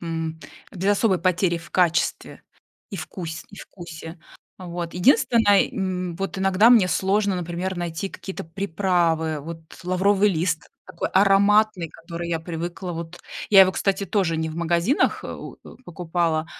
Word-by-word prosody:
м, 160 -1 -4 0.3
без 190 0 -2
особой 200 -3 +2
потери 180 -1 +1
в 165 - -14
качестве 175 -2 0 0.5
и 195 - -5
вкусь 160 0 -6
и 200 - -13
вкусе, 165 -1 -10 0.4
вот. 175 -2 -6
Единственное, 210 0 +4
м, 185 -3 -3
вот 195 +1 -4
иногда 195 +4 +4
мне 210 -7 +6
сложно, 195 +3 +1
например, 180 +2 -3
найти 175 +2 -3
какие-то 190 0 -8
приправы. 165 -3 0
Вот 165 +2 -8 0.2
лавровый 195 +3 +3
лист 160 -3 -2 0.2
такой - - -4
ароматный, 200 -1 +4
который 170 +1 -7
я 165 -1 -1
привыкла. 175 +2 -5
Вот 170 +1 -7 0.3
я 195 -2 +8
его, 190 0 +7
кстати, 195 0 0
тоже 185 -6 0
не 160 0 -2
в 160 - -7
магазинах, 170 - +1
э, - - -6
в - - -8
э, - - -13
покупала, 165 -2 -1
180 Hz, 150 wpm, -23 LUFS, 165-195 Hz, 0.5 s, я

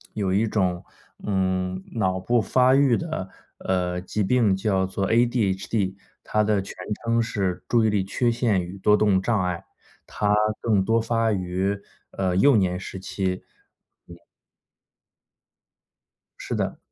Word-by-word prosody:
有 100 -3 -1
一 105 +4 +2
种， 90 -5 0 0.4
嗯， 95 -1 -1
脑 95 -5 0
部 120 +5 +1
发 130 +5 +3
育 135 -4 +4
的， 160 - -4 0.3
呃， 90 -1 -1
疾 105 +3 -2
病 110 -2 +3
叫 95 -1 0
做 95 +1 -2
ADHD， 110 -4 +1 0.3
它 110 - +1
的 105 -2 +1
全 95 - -9 0.3
称 115 0 +2
是 100 -6 -2
注 115 -2 +3
意 - - +3
力 105 -2 +1
缺 120 +5 0
陷 115 -5 +1
与 90 +2 -8
多 105 +2 +4
动 100 -3 +3
障 105 -1 +1
碍。 90 -1 -3 0.4
它 105 0 0 0.3
更 105 -4 +2
多 115 +3 +2
发 115 -1 +1
于， 95 +1 -1 0.3
呃， 95 -2 -1
幼 140 +6 +5
年 90 -3 +1
时 95 0 -7
期。 95 -1 -3 0.6
嗯。 85 - -11 2.2
是 - - -4
的。 - - -2
100 Hz, 165 characters per minute, -24 LUFS, 95-115 Hz, 2.2 s, 幼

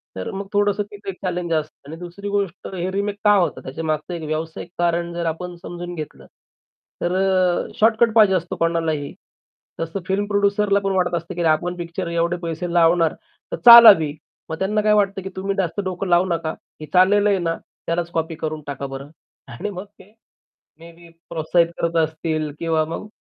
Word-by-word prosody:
तर 95 - -5
मग 195 0 -5
थोडंसं 205 0 +2
तिथे 205 -1 -8
एक 190 - -5
चॅलेंज 175 -2 -2
असतं. 155 -2 -4
आणि 160 - -7
दुसरी 180 +3 -7
गोष्ट 200 -2 -2
हे 180 +1 -2
रिमेक 200 +1 -2
का 210 - +7
होतात? 180 -3 0
त्याच्यामागचं 155 +4 -3
एक 170 -2 -5
व्यावसायिक 160 +2 -4
कारण 170 0 0
जर 170 0 -3
आपण 175 +2 -4
समजून 175 0 -7
घेतलं 155 -2 -8 0.8
तर 175 - 0
अ, 185 -2 +2
शॉर्टकट 225 +1 +4
पाहिजे 210 -4 +6
असतो 175 -1 -2
कोणालाही. 165 -3 -1 0.7
तसं 165 +4 -3
फिल्म 200 +1 0
प्रोड्युसरला 200 0 +2
पण 195 -1 -2
वाटत 180 -2 +1
असतं 170 +2 -5
की 175 - -3
अरे 165 - +3
आपण 175 +3 0
पिक्चर 170 +1 -5
एवढे 170 +1 0
पैसे 170 +1 -4
लावणार 165 -1 +4 0.4
तर - - -2
चालावी. 215 -11 +10 0.4
मग 160 - -5
त्यांना 210 +3 +1
काय 210 0 +3
वाटत 200 -2 +2
की 190 - -5
"तुम्ही 195 +1 -2
जास्त 190 0 -1
डोकं 185 +1 -3
लावू 175 +1 +4
नका, 165 -3 -2 0.3
हे - - -5
चाललेलं 200 +3 +5
आहे 195 -2 +2
ना 165 -1 -1
त्यालाच 170 0 -5
कॉपी 165 0 -2
करून 155 -1 -4
टाका 140 -1 -5
बरं." 135 +1 -8 0.4
आणि 210 +4 -4
मग 185 0 -7
ते 205 +3 -18 0.7
मेबी 170 0 -14 0.2
प्रोत्साहित 165 +1 +2
करत 170 0 -1
असतील 155 -1 -3
किंवा 160 -1 +1
मग 165 +6 -6
175 Hz, 185 wpm, -21 LUFS, 165-195 Hz, 0.8 s, चालावी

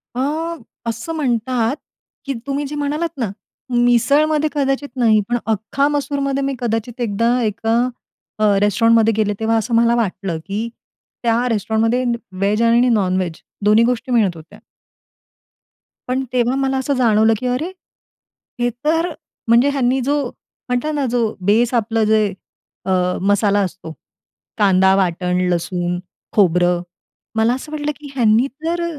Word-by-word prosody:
अ, - - -2 0.7
असं 230 +8 -4
म्हणतात, 250 -3 0 0.5
की 275 - -2
तुम्ही 280 +1 -1
जे 295 - -6
म्हणालात 295 +3 -2
ना, 235 -6 -1 0.4
मिसळमध्ये 285 +6 +3
कदाचित 280 0 0
नाही, 225 -4 +4
पण 240 - +1
अख्खा 225 +6 0
मसूरमध्ये, 280 -1 -1
मी 275 0 -1
कदाचित 235 +1 -3
एकदा, 235 +3 +1
एका 225 +2 0 0.6
अ, - - +1 0.2
रेस्टॉरंटमध्ये 225 +2 +4
गेले, 210 -1 0
तेव्हा 225 0 +1
असं 225 +2 -2
मला 235 +1 +4
वाटलं, 190 -6 -2
की 215 +4 -3 0.5
त्या 235 +2 +2
रेस्टॉरंटमध्ये 225 +3 +1 0.3
व्हेज 200 +4 0
आणि 235 +2 +4
नॉनव्हेज 185 -6 0 0.2
दोन्ही 215 +2 +5
गोष्टी 250 +1 -1
मिळत 205 -7 +2
होत्या. 160 +1 -14 1.5
पण 260 +1 0
तेव्हा 245 0 +2
मला 270 0 0
असं 265 +2 0
जाणवलं, 225 -3 +4
की 255 - -3
अरे, 270 +9 -1 0.9
हे 245 - +2 0.2
तर, 330 +3 +2 0.4
म्हणजे 235 +4 +5
ह्यांनी 265 -2 +1
जो 285 +3 0 0.5
म्हटलं 250 +5 -1
ना, 285 -2 0
जो 230 -3 0
बेस 230 +5 +3
आपलं 225 -1 +1
जे, 215 0 +3 0.6
अ, 190 - -1 0.3
मसाला 205 +1 +2
असतो, 180 -3 -5 0.6
कांदा-वाटण, 190 -3 +2
लसूण, 175 0 -2 0.3
खोबरं, 180 -3 +3 0.5
मला 225 +2 +3
असं 285 +4 -9
वाटलं, 300 -1 -2
की 290 -2 -10
ह्यांनी 235 +1 +3
तर 330 +6 -3
235 Hz, 135 wpm, -19 LUFS, 210-270 Hz, 1.5 s, दोन्ही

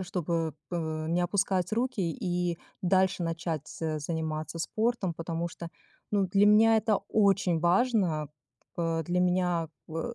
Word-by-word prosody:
чтобы 170 -4 -2
п 160 -2 -3
не 175 +2 +1
опускать 185 0 0
руки 240 0 0
и 175 +1 -1 0.3
дальше 185 0 +2
начать 165 -2 -3
з 155 -2 -3
заниматься 155 +1 -3
спортом. 220 -3 0
Потому 165 +1 -3
что, 170 0 -8 0.4
ну, 200 -2 +2
для 200 +2 +4
меня 220 +2 +6
это 215 -2 +1
очень 195 -5 +3
важно. 175 - +2 0.5
Э, 165 -1 0
для 175 +2 0
меня 180 -2 +1 0.2
в 165 +9 -4
175 Hz, 135 wpm, -29 LUFS, 165-195 Hz, 0.5 s, меня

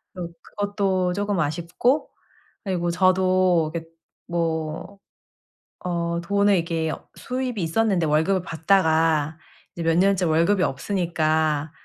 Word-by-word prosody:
또 175 -2 -5
그것도 195 -3 -1
쪼금 205 0 -1
아쉽고 170 - 0 0.6
그리고 175 -3 -1
저도 185 -2 +3
이렇게 165 -1 -5 0.4
뭐 165 +2 -3 0.9
어 170 -1 -1
돈을 200 +3 +2
이렇게 165 -2 -1 0.2
수입이 250 -4 -3
있었는데 175 0 +1
월급을 160 +6 +2
받다가 160 -3 +2 0.4
이제 170 - -4
몇 165 0 +2
년째 195 -1 +3
월급이 170 +4 +2
없으니까 155 -2 0
175 Hz, 250 characters per minute, -23 LUFS, 160-195 Hz, 0.9 s, 저도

